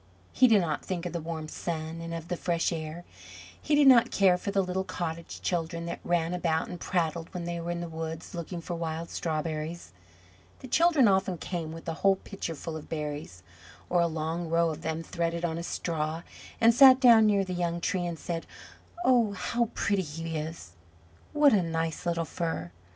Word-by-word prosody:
He 255 - +6
did 215 -4 +5
not 155 -4 -2
think 180 -2 -4
of 175 - -4
the 170 - -2
warm 160 -1 -5
sun 160 0 -4
and 165 0 -6
of 165 0 -5
the 180 - -2
fresh 170 0 0
air; 160 +1 -5 0.6
he 300 - +2
did 290 -1 +5
not 250 -4 +7
care 190 -2 +4
for 180 - -4
the 195 -1 +2
little 185 +1 -2
cottage 170 -3 -5
children 170 -1 -2
that 170 - -4
ran 175 0 0
about 165 -2 0
and 175 - -7
prattled 165 -2 -1
when 175 - -3
they 170 0 -3
were 170 +1 -5
in 175 0 -2
the 170 - -4
woods 160 +2 -6
looking 170 0 -5
for 175 - -5
wild 165 0 -4
strawberries. 155 - -3 0.7
The 260 - -8
children 315 -2 +4
often 190 -2 +2
came 165 -2 -4
with 165 +1 -9
a 165 - -1
whole 195 0 +5
pitcher 190 -4 -6
full 160 +2 -6
of 155 - -8
berries, 150 - -5 0.5
or 175 -1 +4
a 170 - +3
long 160 +1 -3
row 165 0 +2
of 155 +1 -7
them 160 0 -3
threaded 170 0 -2
on 165 -1 -2
a - - -5
straw, 160 -1 -3 0.4
and 230 0 +6
sat 260 +1 +8
down 230 -4 +7
near 200 -2 +3
the 185 - -4
young 170 -1 -1
tree 180 0 -1
and 170 -1 -4
said, 165 0 -4 0.6
"Oh, 235 -5 +4
how 235 +4 -1
pretty 200 -1 +1
he 165 0 -5
is! 155 - -5 0.6
what 295 -3 +5
a 200 - +4
nice 165 0 -2
little 170 -1 0
fir!" 160 - -3
170 Hz, 200 wpm, -28 LUFS, 160-185 Hz, 0.7 s, sat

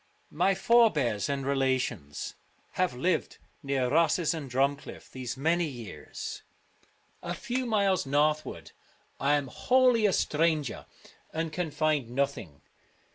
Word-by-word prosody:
My 195 0 +2
forebears 185 - +3
and 140 -1 -2
relations 130 - -1 0.4
have 180 -7 0
lived 175 +9 0 0.2
near 135 -3 0
Rosses 165 +4 +2
and 150 -5 -6
DrumclirT 140 +3 -2
these 130 -1 -5
many 165 +4 +1
years. 120 -7 -7 0.8
A - - -4
few 250 +1 -3
miles 200 -8 +2
northward 150 +2 0 0.5
I 140 +2 +2
am 145 -1 0
wholly 250 - +3
a 195 - +1
stranger, 155 -3 0 0.4
and 160 0 -3
can 175 -1 -2
find 150 -4 0
nothing. 120 - -3
150 Hz, 120 wpm, -29 LUFS, 130-175 Hz, 0.8 s, forebears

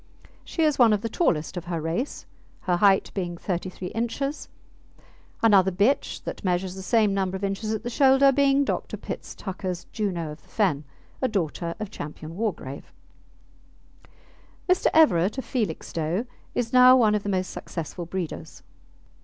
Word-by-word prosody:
She 330 - -2
is 300 -3 +2
one 230 -3 +6
of 205 - 0
the 230 - -3
tallest 180 - 0
of 175 - -5
her 170 -2 -3
race, 165 - -3 0.4
her 180 -2 +1
height 195 +1 +4
being 175 -3 -3
33 180 0 -4
inches; 275 +6 -3 0.9
another 195 -4 +6
bitch 205 +9 +1
that - - -6
measures 180 0 0
the 190 - -8
same 210 +1 +2
number 190 -1 -1
of 195 - -10
inches 200 +2 -2
at 220 - -2
the 240 - -3
shoulder 270 +1 +5
being 280 +1 +3
Dr. - - -3
Pitts - - -7
Tucker's 185 -2 -5
Juno 175 -7 -2
of 150 - -11
the - - -26
Fen, 165 -9 0 0.4
a 260 - +2
daughter 170 -5 -2
of 215 -2 -5
Ch. - - -13
Wargrave. 155 -1 -5 1.8
Mr. 365 0 +3
Everett, 205 - +4
of 265 - -4
Felixstowe, 180 - -2 0.3
is 235 -1 -1
now 255 0 +8
one 220 -4 +4
of 210 - +1
the 205 - -4
most 185 -1 -1
successful 170 +1 -6
breeders. 180 -2 -6
195 Hz, 160 wpm, -25 LUFS, 175-235 Hz, 1.8 s, now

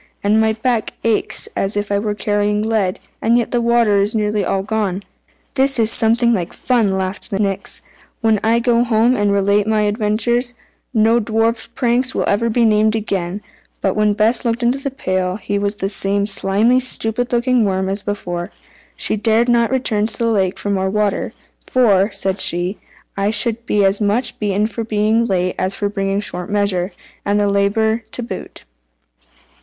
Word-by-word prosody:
And 210 +2 +3
my 220 0 +2
back 225 0 -1
aches 225 -2 0
as 195 +2 -1
if 205 0 -2
I 200 - +2
were 210 0 -2
carrying 205 +1 0
lead, 215 -4 0 0.2
and 230 +2 +3
yet 240 - -1
the 240 - +1
water 235 -4 +3
is 205 +3 -1
nearly 210 -1 0
all 190 +2 -1
gone." 205 -2 -2 0.5
"This 270 0 +1
is 225 -1 +3
something 235 +2 +3
like 180 -5 -2
fun!" 240 -4 +1
laughed 190 +3 -4
the 200 - -2
Nix. 195 -2 -3 0.4
"When 220 -2 +2
I 225 +1 +3
go 235 0 +2
home 235 +1 +2
and 205 -2 +1
relate 200 +1 +2
my 220 -1 +2
adventures, 230 +4 0 0.4
no 225 0 +3
dwarfs 225 +1 -1
pranks 250 +1 0
will - - 0 0.2
be 235 +1 +2
named 215 0 +3
again!" 195 -3 -3 0.4
But 190 - 0
when 210 -1 +2
Bess 220 +5 +1
looked 235 0 -1
into 245 +3 +1
the 275 0 -3
pail, 185 -8 -2
he 205 0 -3
was 200 +1 -1
the 195 - -2
same 200 0 +2
slimy, 210 +4 +2
stupid 245 -1 -1
looking 245 0 +2
worm 190 -2 0
as 195 +1 -3
before. 175 -4 -4 0.5
She - - +1
dared 225 +3 +2
not 235 -1 +3
return 230 -5 +1
to - - -10
the 230 -1 0
lake 190 -4 0
for 205 - -3
more 190 -1 0
water 210 0 -1 0.4
"for," 210 -5 +3
said 190 -1 -2
she, 175 +4 0 0.4
"I 200 +1 0
should 230 +2 -1
be 205 -1 +2
as 195 +2 +1
much 210 +5 0
beaten 205 0 0
for 230 +1 -4
being 220 +1 +1
late 185 -3 0
as 190 +1 -1
for 205 - -1
bringing 195 0 -1
short 180 -3 -5
measure, 200 -3 0 0.3
and 205 +1 +1
have 205 - +2
the - - 0
labour 220 +3 +1
to 245 - -2
boot." 230 - -8
210 Hz, 185 wpm, -18 LUFS, 200-230 Hz, 0.5 s, And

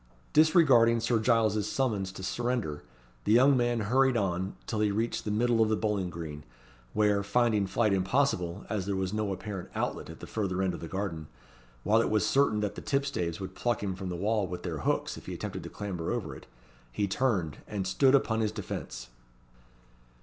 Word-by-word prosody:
Disregarding 140 -8 +5
Sir 115 0 +1
Giles's 110 -2 +2
summons 105 -8 0
to 95 - -8
surrender, 120 -10 -2 0.4
the 105 - +2
young 135 +4 +6
man 120 -2 +1
hurried 130 +4 +3
on 95 -2 -1
till 110 - -3
he 105 -1 +3
reached 110 +3 -1
the - - -2
middle 115 +2 +2
of 110 - +3
the 110 - +2
bowling 105 -4 -1
green, 80 -3 -7 0.5
where, 105 -1 +3
finding 105 -1 +2
flight 105 +2 +1
impossible, 95 -2 0
as 100 -4 -2
there 100 - 0
was 95 0 -2
no 105 -2 -1
apparent 95 -1 -5
outlet - - -2
at - - -10
the - - -8
further 95 -3 -2
end 95 -2 0
of - - -6
the 85 - -6
garden, 85 -5 -4 0.6
while 110 +3 +4
it - - 0
was 110 -1 +2
certain 135 -6 +2
that 105 -1 -1
the - - -8
tipstaves 135 - -1
would 95 -1 -6
pluck 120 +1 -1
him 95 -2 -1
from 95 0 -6
the 90 - -3
wall 105 +2 0
with 90 0 -6
their - - -3
hooks - - -1
if - - -12
he - - -4
attempted - - -5
to - - -8
clamber 95 -5 -4
over - - -3
it, - - -13 0.4
he 100 +11 -1
turned, 95 - 0
and 100 -3 -3
stood 130 +8 +4
upon 115 -4 +1
his 110 -2 +1
defence. - - -6
105 Hz, 200 wpm, -29 LUFS, 95-115 Hz, 0.6 s, young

